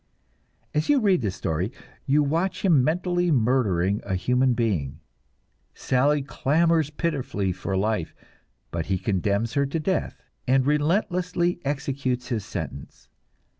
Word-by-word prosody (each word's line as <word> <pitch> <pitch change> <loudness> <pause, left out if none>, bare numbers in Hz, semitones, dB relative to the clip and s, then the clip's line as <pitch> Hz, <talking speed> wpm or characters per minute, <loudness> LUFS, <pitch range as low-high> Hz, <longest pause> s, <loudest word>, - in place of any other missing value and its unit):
As 150 - 0
you 290 -1 +5
read 200 - +3
this 100 -5 -2
story, 90 +7 -2 0.4
you 145 +2 +4
watch 170 +7 -1
him 155 -9 +5
mentally 175 +3 +1
murdering 110 - +2
a 95 -2 -2
human 125 +6 +2
being; 85 - -1 0.8
"Sally" 140 +3 +1
clamors 155 +2 +1
pitifully 140 - -2
for 95 +1 -3
life, 105 -4 -1 0.6
but 85 -1 -3
he 95 - +1
condemns 100 +4 -1
her 140 0 +1
to 160 +4 -2
death, 185 +3 -2 0.2
and 130 0 +3
relentlessly 175 +3 +1
executes 135 -3 -2
his 115 -5 -1
sentence. 80 -8 -7
135 Hz, 130 wpm, -25 LUFS, 100-160 Hz, 0.8 s, you